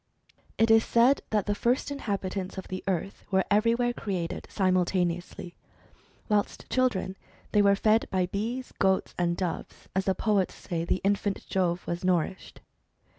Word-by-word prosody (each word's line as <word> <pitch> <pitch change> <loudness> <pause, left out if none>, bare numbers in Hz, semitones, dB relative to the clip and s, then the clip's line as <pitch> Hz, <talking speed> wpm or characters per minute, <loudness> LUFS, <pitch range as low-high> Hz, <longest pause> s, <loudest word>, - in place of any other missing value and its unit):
It 225 0 +4
is 225 0 +6
said 240 +4 +4
that 210 -2 +1
the 205 - +1
first 245 +7 0
inhabitants 195 -8 -3
of 190 - -7
the 185 0 -5
earth 195 +1 -2
were 190 -1 +2
everywhere 230 +3 +3
created 185 -8 -4
simultaneously. 180 -2 0 0.7
Whilst 210 -1 0
children 225 -7 +1 0.4
they 210 - +4
were 200 0 +5
fed 220 +2 +3
by 185 -1 +1
bees, 225 +7 -4
goats, 190 -1 +2
and 170 -1 +1
doves, 180 -3 -5
as 190 0 +1
the 190 - +2
poets 200 -2 +1
say 170 -1 -4
the 185 - 0
infant 200 0 0
Jove 180 -2 0
was 170 +1 -3
nourished. 185 0 -1
195 Hz, 150 wpm, -28 LUFS, 185-215 Hz, 0.7 s, is